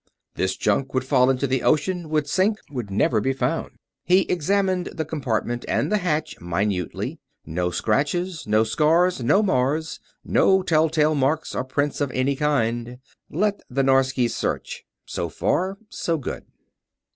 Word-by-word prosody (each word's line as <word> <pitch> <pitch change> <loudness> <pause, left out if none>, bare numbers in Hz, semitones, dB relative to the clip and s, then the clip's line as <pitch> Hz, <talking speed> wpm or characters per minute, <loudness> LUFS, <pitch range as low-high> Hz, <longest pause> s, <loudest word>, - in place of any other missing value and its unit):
This 95 0 -1
junk 135 +6 0
would 130 - +1
fall 130 -1 +3
into 135 +1 +1
the 130 -1 0
ocean; 165 +2 +1
would 150 -2 0
sink; 195 +7 +2
would 120 -7 -5
never 105 +2 +2
be 135 +5 0
found. 165 +5 -2 0.3
He 185 +2 +4
examined 185 +1 0
the 160 - -4
compartment 120 -6 -2
and - - 0
the 210 - +3
hatch 160 -4 -1
minutely. 90 +1 -2 0.3
No 90 +3 -1
scratches, 150 - -1
no 110 +1 +3
scars, 165 +6 +2
no 195 - +4
mars; 155 -1 0 0.3
no 190 -1 +3
tell 160 -2 +3
tale 155 -1 +2
marks 145 +2 0
or - - -1
prints 145 +3 -2
of 145 - +1
any 130 +2 +1
kind. 120 -4 0 0.3
Let 205 +5 0
the 135 +1 0
Norskies 135 -2 +2
search. - - -3 0.2
So - - -3
far, 190 +2 -1
so 165 -1 -1
good. 140 - -6
145 Hz, 155 wpm, -23 LUFS, 125-165 Hz, 0.3 s, He